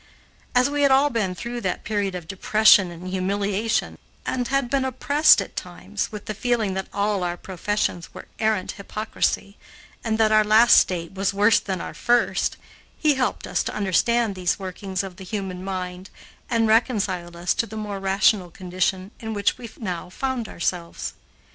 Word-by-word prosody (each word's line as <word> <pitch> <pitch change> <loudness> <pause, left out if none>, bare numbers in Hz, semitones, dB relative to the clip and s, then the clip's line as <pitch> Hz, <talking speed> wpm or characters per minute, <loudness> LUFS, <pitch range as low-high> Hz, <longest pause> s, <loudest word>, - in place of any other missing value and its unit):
As 250 +2 +5
we 290 0 -1
had 280 - +5
all 275 +2 +4
been 195 -6 -1
through 240 +5 -5
that 185 -4 -2
period 205 -3 -1
of 175 -2 -7
depression 200 0 +5
and 175 +1 -9
humiliation, 200 +3 -1 0.3
and 250 -2 -1
had 275 -2 +1
been 270 +2 +1
oppressed 285 +4 +4
at - - -14
times - - -5
with 210 -1 -8
the 215 - -3
feeling 220 -2 0
that 190 0 -3
all 200 -1 0
our 175 0 -2
professions 190 -1 -2
were - - -10
arrant 215 -4 +1
hypocrisy 205 0 -3 0.4
and 220 -1 0
that 220 -1 +3
our 215 0 +6
last 220 +3 +7
state 170 -1 -1
was 195 0 -1
worse 205 +2 +5
than 190 -2 -4
our - - -6
first, 240 0 +1 0.4
he 305 -2 +3
helped 260 -2 -1
us - - 0
to - - -4
understand 215 +3 +2
these 180 -2 0
workings 190 0 -4
of 190 -2 -8
the 195 - -9
human 185 -2 -5
mind 185 -1 -5 0.4
and 230 -2 +2
reconciled 200 -6 +1
us 175 +1 0
to 230 - -1
the 220 - -8
more 205 -2 -4
rational 195 -1 +2
condition 185 +2 -2
in 220 -1 -5
which 205 - 0
we 235 -2 -8
now 180 -5 -4
found 255 +2 -3
ourselves. 170 0 -3
200 Hz, 175 wpm, -23 LUFS, 185-225 Hz, 0.4 s, last